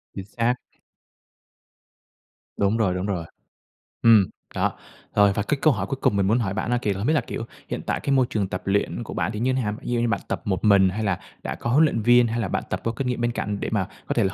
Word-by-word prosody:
Chính 95 - -6
xác. 115 +4 0 2.0
Đúng 100 +3 +2
rồi, 100 -5 +2
đúng 90 +2 -2
rồi. 90 -5 -2 0.8
Ừm, 110 -4 +7 0.3
đó, - - 0 0.4
rồi. 100 -1 +5
Và 105 - 0
cái 145 - 0
câu 155 -3 +5
hỏi 100 -2 -3
cuối 135 - -3
cùng - - +2
mình 95 - +2
muốn 110 +5 +3
hỏi 100 -5 -1
bạn 110 +3 -2
á 120 - +2
kìa 105 - 0
là - - -6
không 110 - -1
biết 155 - +3
là, 155 - +3
kiểu, 115 - -5 0.2
hiện - - -3
tại - - 0
cái 140 - -2
môi 130 -1 +4
trường 105 -7 -1
tập 90 - -4
luyện 95 -11 0
của - - -7
bạn - - -1
thì 105 - -4
như 130 +3 +1
nào? 115 -5 -1
Ví - - -7
dụ 120 - +1
như 120 - +1
bạn - - 0
tập - - -3
một 95 -2 -1
mình 100 -2 +6
hay 105 +4 -3
là 100 -4 0 0.2
đã - - -3
có 120 - -4
huấn 145 +6 +5
luyện 115 -7 0
viên, 120 +2 +5
hay 115 +1 -2
là 105 - -1
bạn - - -2
tập - - -2
có 115 - 0
kinh 125 +3 -3
nghiệm 125 -1 -1
bên 120 0 +1
cạnh, 105 -3 -3
để - - -2
mà 100 -4 0 0.2
có - - 0
thể 115 - +3
là 95 - 0
110 Hz, 275 wpm, -24 LUFS, 100-120 Hz, 2.0 s, Ừm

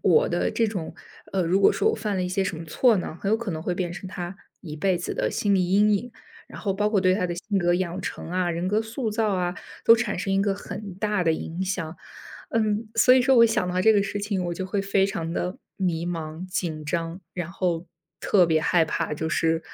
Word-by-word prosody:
我 460 - +4
的 - - 0
这 230 - +1
种 185 -6 -4 0.4
呃， 190 -2 +1
如 180 +4 +2
果 - - +6
说 440 - +2
我 - - -1
犯 210 -3 -2
了 185 - 0
一 180 - -1
些 190 +1 0
什 185 -3 -2
么 165 - -7
错 225 +8 +3
呢， 175 -2 -4
很 200 - -1
有 220 - +4
可 230 -3 -4
能 160 -2 -4
会 180 - -1
变 175 -2 -2
成 190 +1 -7
他 175 0 -5 0.3
一 155 -4 -7
辈 185 +3 +1
子 175 - -4
的 - - 0
心 200 -1 +1
理 180 -1 +1
阴 210 +2 +4
影。 240 +5 -3 0.4
然 - - -10
后 200 -3 0
包 210 +2 +1
括 210 -3 +2
对 185 -1 +4
他 185 -2 0
的 175 - -3
性 200 +3 -2
格 175 -1 +2
养 185 0 -2
成 170 - -6
啊、 180 -1 0
人 170 +2 -2
格 210 +2 +2
塑 225 +1 -3
造 210 -2 +1
啊， 180 -1 0 0.3
都 230 - +8
产 225 -4 -1
生 195 +2 -2
一 195 - +3
个 200 -1 +1
很 200 -1 -7
大 210 -2 0
的 165 - +3
影 165 +2 -5
响。 180 -4 -3 0.5
嗯， 215 0 0
所 250 +3 +6
以 260 - +6
说， 260 +1 +4
我 230 - +9
想 215 -5 +1
到 180 +1 0
这 220 - +6
个 205 - +4
事 200 +1 -2
情， 200 -3 -2
我 175 0 -2
就 190 - -4
会 195 +1 -1
非 195 0 +2
常 165 -4 -3
地 180 +1 -3 0.2
迷 175 -3 -1
茫、 165 0 -5
紧 165 -5 -3
张， 165 +3 -3
然 175 -2 -4
后 175 -2 -2 0.3
特 185 -4 +4
别 160 -1 +2
害 165 +1 +3
怕， - - -2
就 160 +2 -2
是 165 0 +1
185 Hz, 270 characters per minute, -25 LUFS, 175-210 Hz, 0.5 s, 我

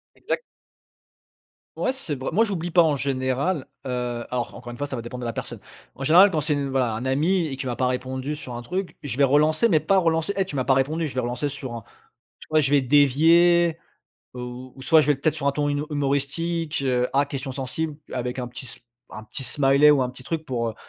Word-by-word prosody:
Exact. 485 - -3 1.4
Ouais - - +1
c'est 215 - -4
vrai, 130 - -3
moi 220 +6 +4
j'oublie 175 -5 -3
pas 175 - +6
en 155 -3 +3
général, 135 +4 -1 0.2
heu, 125 -2 -3
alors 125 -1 -3
encore 120 -1 -9
une 120 - -9
fois 145 - -2
ça 135 - -5
va 115 - -5
dépendre 125 +1 -7
de - - -4
la 115 - -3
personne. - - -6 0.3
En 135 - -8
général 180 +7 +7
quand 155 - 0
c'est 150 0 0
une 140 -1 -2
voilà 125 -4 +1
un 125 - -5
ami 160 +7 +1
et 140 - -4
qu'il 130 -1 -4
m'a 120 - -2
pas 130 - 0
répondu 130 +3 -2
sur 125 -5 -8
un 120 - -6
truc, 185 +9 -4
je 135 -4 -4
vais 140 - +5
relancer 155 - +3
mais 160 -6 +4
pas 195 - +2
relancer: 165 +2 +1
«Eh 195 - +3
tu 150 - -7
m'as 130 - 0
pas 135 - +4
répondu!» 155 +5 0
je - - -8
vais 130 - -1
relancer 125 +4 -2
sur 130 -3 -7
un 115 - -7 0.6
tu - - -12
vois, 155 0 +4
je 140 -1 +1
vais 145 - +5
dévier, 160 +5 +4 0.6
heu, 125 - -5
ou 125 +2 -8
soit 160 +3 +5
je 150 - -1
vais 145 - +4
peut-être 155 +3 0
sur 140 -2 -1
un - - +1
ton 145 +1 -1
huno 145 +1 -1
humoristique: 145 +2 -1 0.3
«Ah 140 +1 +3
question 135 -1 -5
sensible» 140 +4 -4 0.2
avec 125 0 -3
un 125 - -3
petit 120 +2 -9
s 115 - -11 0.3
un 110 0 -9
petit 120 - -6
smiley 135 +3 +4
ou 145 - +4
un 125 - 0
petit 125 +1 -11
truc 160 +4 -4
pour, 120 -5 -2
heu, 110 - -5
140 Hz, 240 wpm, -24 LUFS, 130-155 Hz, 1.4 s, général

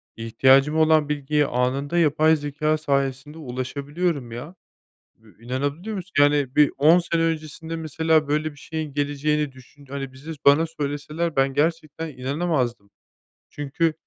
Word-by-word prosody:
İhtiyacım 135 +6 +3
olan 155 -2 +4
bilgiye 150 0 +1
anında 135 +5 -1
yapay 155 0 +4
zekâ 150 +1 -1
sayesinde 140 0 -2
ulaşabiliyorum, 140 +1 -3
ya. 135 +10 -8 0.7
Eee, 110 - -19 0.2
inanabiliyor 145 - -3
musun? 190 0 -7
Yani 145 -2 +3
bir 150 -1 +5
10 160 +5 +6
sene 170 -1 -1
öncesinde 160 0 -3
mesela 160 -1 +1
böyle 150 +1 0
bir 145 - -18
şeyin 155 -1 -5
geleceğini 145 0 0
düşün 130 +2 -17
hani 135 -1 -6
bize 145 +5 -9
bana 145 +4 +6
söyleseler 150 +2 -3
ben 135 0 +2
gerçekten 160 +1 -1
inanamazdım. 130 -6 -2 0.6
Çünkü 150 +3 -1
145 Hz, 130 wpm, -23 LUFS, 135-160 Hz, 0.7 s, 10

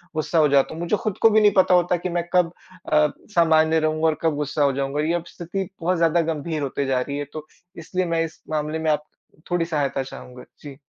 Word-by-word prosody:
गुस्सा 160 +2 -1
हो 155 - +5
जाता 140 +1 +3
हूँ। 165 - -7
मुझे 175 +5 +1
खुद 215 -2 -3
को 225 - +7
भी 220 0 +4
नहीं 210 -1 +6
पता 185 -1 +5
होता 180 0 +3
कि 180 +1 -4
मैं 175 0 -1
कब 180 -2 +3 0.4
अ, 150 0 +5 0.3
सामान्य 160 -1 +4
रहूँगा 155 +1 +1
और 155 -1 +1
कब 160 -2 +1
गुस्सा 145 +1 -1
हो 140 -1 +3
जाऊँगा, 140 +2 -2
ये 160 +2 0
अब 175 -1 -1
स्थिति 180 +2 -5
बहुत 180 +2 +1
ज़्यादा 165 0 +3
गंभीर 155 0 -4
होती 140 0 -2
जा 130 -1 +1
रही 140 +2 -4
है। 145 - -3
तो 155 -1 -7 0.3
इसलिए 180 +3 -2
मैं 165 -1 0
इस 160 - -11
मामले 155 0 -2
में 160 -1 +1
आप 150 0 -1 0.5
थोड़ी 175 -1 +1
सहायता 145 -4 -1
चाहूँगा। 125 -1 -11 0.2
जी। 140 -3 -10
160 Hz, 235 wpm, -23 LUFS, 150-175 Hz, 0.5 s, को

